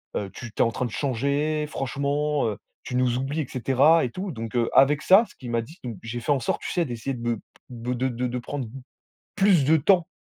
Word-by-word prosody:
heu, 100 - -2
tu 120 - -8
t'es - - -2
en 115 - +1
train 125 - -2
de 120 - -5
changer 140 +5 0
franchement, 145 +1 -1
heu, 105 -2 -3 0.3
tu 125 - -5
nous 125 -1 +2
oublies!» 135 +4 -2
et 140 - -4
cetera 135 +6 +3
et 120 - -4
tout. 185 +5 -4
Donc 115 -4 -6
heu, 120 -1 +2
avec 145 +2 +5
ça, 195 +8 +6
ce - - -18
qu'il 125 - -9
m'a 115 -1 +1
dit 160 +11 -14
donc 120 -5 -5
j'ai 115 +1 -4
fait 135 - -1
en 140 - +3
sorte, 120 - -2
tu - - -4
sais, 175 -2 +1
d'essayer 125 +1 -4
de 120 - -8
be 120 -2 -1 0.3
de 120 0 -4
de 125 +1 0
de 125 +1 -2
de 125 +1 -3
prendre 130 +1 -5 0.7
plus 195 -6 +4
de 160 +3 +5
temps 175 +3 +3
130 Hz, 245 wpm, -25 LUFS, 120-150 Hz, 0.7 s, ça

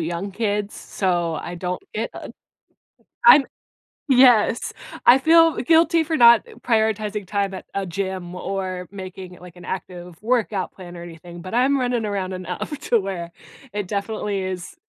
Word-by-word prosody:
young 170 +4 -4
kids, 210 -1 -2
so 175 -4 -1
I 175 +3 -6
don't 180 +1 -4
get, - - -2
uh - - -9 1.0
I'm 295 - +9 0.6
yes, 245 -4 +4 0.3
I 255 - +8
feel 330 +2 +5
guilty 325 +3 +3
for 320 0 -1
not 235 -2 +7 0.2
prioritizing 215 -3 0
time 200 -1 -1
at 185 - -8
a 195 -1 -1
gym 185 0 -4
or 185 -1 -4
making 185 -1 -8
it, - - -17
like, 180 -1 -13
an 175 - -13
active 180 -1 -7
workout 215 -5 0
plan 175 -2 -11
or 170 - -8
anything, 170 0 -11
but, 185 +4 -7
I'm 270 +3 +3
running 245 -3 -1
around 195 -2 -3
enough 185 - -5
to 235 - +4
where 175 -3 -5 0.4
it 205 -2 -3
definitely 205 -1 -2
is 185 -1 -5
195 Hz, 155 wpm, -22 LUFS, 180-230 Hz, 1.0 s, I'm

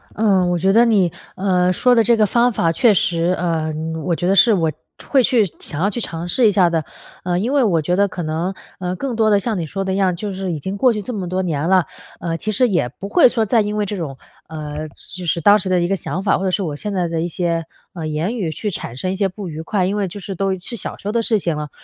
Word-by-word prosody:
嗯， 195 -4 +2
我 175 - +1
觉 190 +3 +2
得 230 +3 +6
你， 200 -7 +3 0.2
呃， 185 -2 +2
说 250 +7 +3
的 230 - +5
这 235 +1 +3
个 215 - +4
方 240 +4 +3
法 170 -6 +1
确 220 +7 +4
实 175 -1 +1
呃， 165 -2 -1 0.3
我 175 -2 +1
觉 175 - -2
得 195 - +3
是 225 +3 +6
我 165 -5 +1 0.4
会 270 - +4
去 240 -4 +3
想 145 - -5
要 200 - +2
去 235 +3 -3
尝 170 -3 -4
试 230 +6 +3
一 - - +4
下 185 -3 +4
的， 165 -2 0 0.4
呃， 175 -1 0
因 235 +8 -1
为 280 -2 +4
我 180 -8 +2
觉 175 +4 0
得 200 +2 +3
可 180 -2 -5
能， 160 +4 -2 0.3
呃， 180 0 -3
更 255 +4 -3
多 220 -1 +3
的 205 -1 +4
像 215 +1 -2
你 165 - -3
说 195 +5 -3
的 190 0 -2
一 - - -1
样， 190 -2 +2
就 205 +3 -4
是 190 -1 -3
已 160 - -3
经 190 +7 -4
过 250 +4 +4
去 210 - -3
这 250 - -5
么 190 -5 -4
多 185 +1 -1
年 160 -2 -1
了， 185 -2 +4 0.3
呃， 165 -1 -2
其 215 - -3
实 245 +5 +3
也 175 - +1
不 190 +10 -9
会 290 - +6
说 230 -2 +1
再 225 +2 +3
因 210 0 -2
为 210 - +1
这 205 - -4
种， 155 -8 -5 0.3
呃， 155 -1 -6
就 180 +5 -9
是 170 - +1
当 205 +5 +6
时 190 - -2
的 180 -1 +3
一 175 - +1
个 195 - +1
想 185 0 -4
法， 200 - +3
或 - - -3
者 - - +2
是 195 - 0
我 155 -5 -3
现 210 +8 -5
在 180 -3 0
的 165 -1 -2
一 170 - -1
些， 170 -1 -1 0.3
呃， 165 -3 -5
言 155 +9 -2
语 185 -7 -1
去 205 +6 -3
产 120 -8 -6
生 185 +7 -2
一 - - -2
些 195 0 0
不 190 +1 -8
愉 155 0 -6
快， 185 +3 0
因 195 +3 -1
为 200 -2 0
就 195 +3 -8
是 195 0 -6
都 190 +1 -1
是 185 +6 -6
小 - - -5
时 - - -9
候 - - 0
的 235 +1 +1
事 225 -1 +1
情 170 -5 -1
了， 150 -1 -5
185 Hz, 315 characters per minute, -19 LUFS, 170-210 Hz, 0.4 s, 得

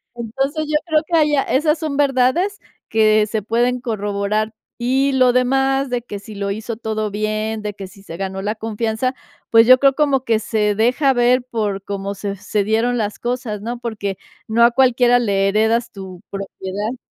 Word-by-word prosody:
Entonces, 270 +7 -2
yo 305 - -1
creo 315 -2 +2 0.2
allá 295 -2 +3
esas 300 +3 +1
son 305 -3 -3
verdades 285 +9 +2 0.3
que 215 -1 +4
se 220 0 -2
pueden 240 +3 +1
corroborar, 210 -1 -2 0.3
y 265 +3 +1
lo 255 -2 +4
demás, 270 +2 +1
de 245 -1 -2
que 205 -4 -7
si 210 +1 -11
lo 200 0 -2
hizo 220 +3 -4
todo 215 -2 -2
bien, 215 +1 -2
de 210 -1 -3
que 195 -1 -8
si 195 +1 -17
se 165 - -9
ganó 190 0 -4
la 210 +1 -1
confianza, 225 +3 -2 0.3
pues, 225 0 +6
yo 255 - +9
creo 275 -1 +4
como 275 -3 +1
que 225 -3 +1
se 210 -1 0
deja 250 +6 +2
ver 245 0 +3
por 210 -5 -3
cómo 200 0 -4
se 200 0 -4
se 205 +1 -2
dieron 225 +4 +1
las 210 -2 -2
cosas, 240 -4 -3
¿no? 235 +2 -5
Porque 205 -5 -4 0.3
no 230 +2 +3
a 235 - +6
cualquiera 245 -1 +4
le 195 -4 +1
heredas 220 +3 +1
tu 190 -3 -10
propiedad. 195 +4 -5
225 Hz, 180 wpm, -19 LUFS, 210-255 Hz, 0.3 s, yo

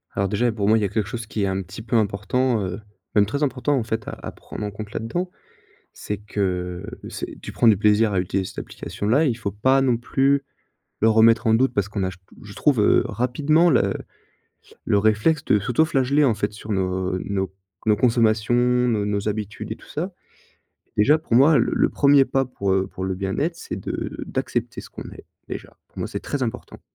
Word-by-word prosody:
Alors 100 0 +1
déjà 105 +5 +1
et 120 - +2
pour 105 -2 -2
moi, 110 +1 +5
il - - 0
y - - 0
a - - +1
quelque 105 -1 -1
chose 115 -2 -5
qui 105 -2 -2
est - - +2
un 95 0 -1
petit 95 +5 -9
peu 120 - -2
important, 110 +3 +1
heu, 95 +4 -5 0.3
même 105 - +5
très 140 +6 -2
important, 140 +1 0
en 120 - 0
fait, 110 -1 -4
à - - -3
à - - -5
prendre - - -9
en 105 - -4
compte 105 0 -8
là-dedans. 175 - -3 0.6
C'est 105 - -5
que, 90 -4 -3 0.2
c'est - - -7
tu - - -7
prends 120 - +2
du 105 -4 +6
plaisir 105 +1 +3
à 95 - +2
utiliser 95 +1 -1
cette - - -7
application-là. 120 +10 -1
Il 125 -6 +1
faut 100 -3 -3
pas 130 +6 +3
non 125 -3 +2
plus 135 +3 +1 0.6
le 110 - +5
remettre 115 +1 +5
en 110 - +5
doute 130 +1 +2
parce 100 -2 0
qu'on 105 -2 -2
a,- 95 - 0
j 95 - -13 0.3
je 100 - -10
trouve- 140 -2 +2
heu, 105 - +5
rapidement 150 +7 +2
le - - +3 0.9
le 100 - +2
réflexe 110 +10 +2
de 105 - +3
s'autoflageller, 140 +4 +2
en 120 -5 +3
fait, 105 +1 -2
sur 105 +1 -8
nos 95 -1 -1
nos 95 -1 -3 0.3
nos 105 -1 +4
consommations, 115 -2 +2
nos 120 -3 +2
nos 105 0 -1
habitudes 105 0 -4
et - - -16
tout - - -18
ça. 175 +6 -4 0.8
Déjà, 145 +9 +5
pour 155 - -5
moi, 140 +5 +6
le 115 - +1
le - - +2
1er 140 -1 +5
pas 135 0 +1
pour, 100 -6 -1
heu, 95 0 +1
pour 95 -1 -6
le 95 -1 -2
bien-être, 100 - -2
c'est 165 - -6
de - - -5
d'accepter - - -3
ce - - -13
qu'on - - -9
est, - - -12 0.2
déjà. - - -8
Pour - - -12
moi, - - -2
c'est - - -4
très 140 -3 -3
important 115 - -6
110 Hz, 220 wpm, -23 LUFS, 100-130 Hz, 0.9 s, du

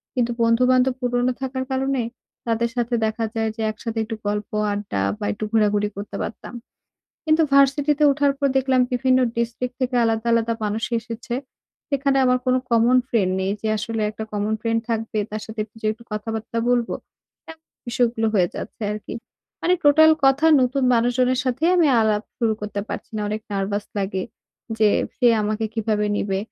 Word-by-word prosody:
কিন্তু 240 -1 +1
বন্ধু-বান্ধব 250 +2 +3
পুরোনো 245 0 +1
থাকার 260 0 -2
কারণে 265 0 0 0.5
তাদের 230 +1 +1
সাথে 240 0 -1
দেখা 220 +1 -1
যায় 225 0 0
যে 225 - -6
একসাথে 225 +1 -6
একটু 225 0 -5
গল্প, 210 0 -2 0.2
আড্ডা 205 - -3 0.2
বা - - -3
একটু 215 - -7
ঘোরাঘুরি 210 -2 +2
করতে 205 +1 -7
পারতাম। 230 - -6 0.7
কিন্তু 315 +1 +3
ভার্সিটিতে 280 +2 +4
ওঠার 285 0 +2
পর 280 - +2
দেখলাম 260 -1 +3
বিভিন্ন 255 +1 +3 0.2
ডিস্ট্রিক্ট 235 +2 -2
থেকে 255 0 -1
আলাদা, 225 0 0
আলাদা 230 0 +2
মানুষ 215 +2 -1
এসেছে। 235 +1 -6 0.5
সেখানে 275 -1 +1
আমার 250 0 +3
কোনো 255 0 +3
কমন 235 +2 +4
ফ্রেন্ড 195 -7 +1
নেই। 190 - 0
যে 220 - -1
আসলে 225 +2 -3
একটা 220 +1 -6
কমন 210 +1 -1
ফ্রেন্ড 230 0 0
থাকবে, 225 -1 -2
তার 215 0 -4
সাথে 220 0 -6
একটু 215 - -25
যেয়ে 215 -1 +1
একটু 235 +1 -18
কথাবার্তা 220 +1 -4
বলবো। 240 -1 +1 0.6
এমন 320 0 -14 0.2
বিষয়গুলো 235 -2 +1
হয়ে 180 -3 +3
যাচ্ছে 225 - -7
আরকি। 210 0 -7 0.5
মানে 360 +2 +3
টোটাল 315 +2 +7
কথা 270 +4 +4
নতুন 260 +2 +1
মানুষজনের 250 +2 +2
সাথেই 265 +7 +1
আমি 335 -4 +4
আলাপ 215 -1 +2 0.2
শুরু 230 -3 +2
করতে 210 -1 -4
পারছি - - -6
না। - - -2
অনেক 215 +1 -3
নার্ভাস 200 +1 -2
লাগে 190 -1 -2 0.6
যে 215 -1 +5 0.3
সে 245 - +4
আমাকে 215 +1 -1
কিভাবে 210 -1 0
নিবে? 195 -2 -1
230 Hz, 170 wpm, -22 LUFS, 215-255 Hz, 0.7 s, টোটাল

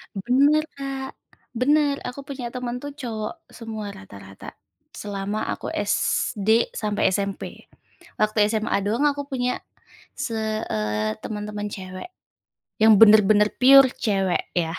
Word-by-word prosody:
Bener, 280 +9 +2
Kak, 270 -1 -6 0.4
bener, 285 +3 +2
aku 275 +2 -7
punya 255 -4 -6
temen 250 0 -5
tuh 285 - -5
cowok 230 -7 -6
semua 220 -3 -7
rata-rata, 95 0 -12 0.4
selama 205 +1 -4
aku - - -7
SD 220 +1 +1
sampai 210 -2 0
SMP. 200 -1 -5 0.5
Waktu 215 0 +2
SMA 220 -1 -1
doang 235 +8 +1
aku 285 0 -1
punya 250 -2 -3 0.5
se 220 -1 -3
eee, 105 0 -2
temen-temen 210 -1 -5
cewek, 185 - -8 0.7
yang 220 0 +6
bener-bener 210 -1 +6
pure 265 0 +7
cewek 195 -4 0
ya. 170 0 -1
220 Hz, 120 wpm, -23 LUFS, 200-255 Hz, 0.7 s, pure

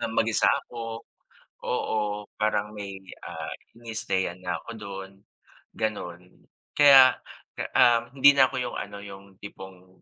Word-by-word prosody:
na 115 - -2
mag-isa 110 -3 +2 0.2
ako, 115 -1 -7 0.6
oo. - - -2 0.4
Parang 105 -1 0
may, 100 -2 -7 0.2
ah, - - -7 0.3
iniistayan 100 -6 -3
na 90 -2 -2
ko 115 - -7
dun, 100 -3 -8 0.7
ganon. 90 -5 -5 0.3
Kaya, 135 -3 +7 0.6
ah, 120 -1 +4
hindi 140 +1 +7
na 130 -2 +5
ko 130 - -5
yung 125 -1 -3
ano, 100 - -6
yung 100 -1 -12
tipong, 95 -2 -13
105 Hz, 125 wpm, -26 LUFS, 95-120 Hz, 0.7 s, Kaya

